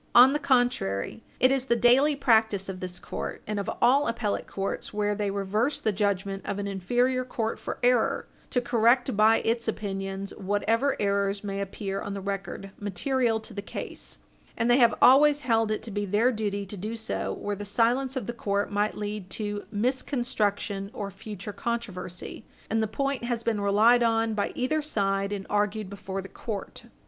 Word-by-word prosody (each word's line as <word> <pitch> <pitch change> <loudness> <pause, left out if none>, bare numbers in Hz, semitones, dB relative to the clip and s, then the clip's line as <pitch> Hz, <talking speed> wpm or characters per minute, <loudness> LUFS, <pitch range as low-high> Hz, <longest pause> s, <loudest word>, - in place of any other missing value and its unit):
On 255 +3 +9
the 295 - 0
contrary, 245 - +1 0.2
it 255 - +5
is 270 -1 +1
the 235 - +2
daily 255 +6 +5
practice 220 -7 +3
of 190 -1 -5
this 180 -1 -6
court, - - -6
and 210 -1 -2
of 200 - -3
all 275 +4 +5
appellate 230 -3 -2
courts 195 0 -4
where 210 0 0
they 205 -1 -1
reverse 200 +7 0
the 215 - +1
judgment 195 -1 -1
of - - -3
an 200 - -3
inferior 245 +7 +1
court 230 -3 -3
for - - -5
error, 245 -2 +3 0.2
to 250 - +1
correct 240 0 +3
by 215 +2 +5
its 230 +1 0
opinions 195 -2 -3
whatever 220 +7 0
errors 200 0 0
may 200 -1 -3
appear 195 0 -4
on 200 0 -4
the - - -3
record 195 0 -5
material 225 +4 0
to - - -9
the 200 - -4
case, 205 - -8 0.4
and 230 +1 +2
they 245 - +5
have 235 -3 +5
always 290 +3 +7
held 225 -5 +2
it 215 - -2
to 225 - -6
be 205 +1 -2
their 210 +6 +3
duty 205 -3 -2
to 195 - -8
do 215 +5 -4
so 225 - -3
where 205 0 -3
the 205 - -6
silence 245 +6 +1
of 255 -5 -2
the 240 - -4
court 200 -3 -1
might 205 +1 0
lead 210 -2 -4
to 205 +2 -4
misconstruction 210 -4 -1
or 200 -1 -4
future 205 0 -7
controversy 205 -6 -5 0.3
and 225 0 +2
the 220 - +1
point 275 +4 -2
has 235 -1 -2
been 220 -3 0
relied 215 +5 +5
on 225 -1 +2
by 205 -1 -1
either 305 +5 0
side 200 -8 0
and 200 -2 -4
argued 210 -1 -1
before 195 -1 -5
the - - -8
court. 205 0 -6
215 Hz, 185 wpm, -27 LUFS, 200-240 Hz, 0.4 s, On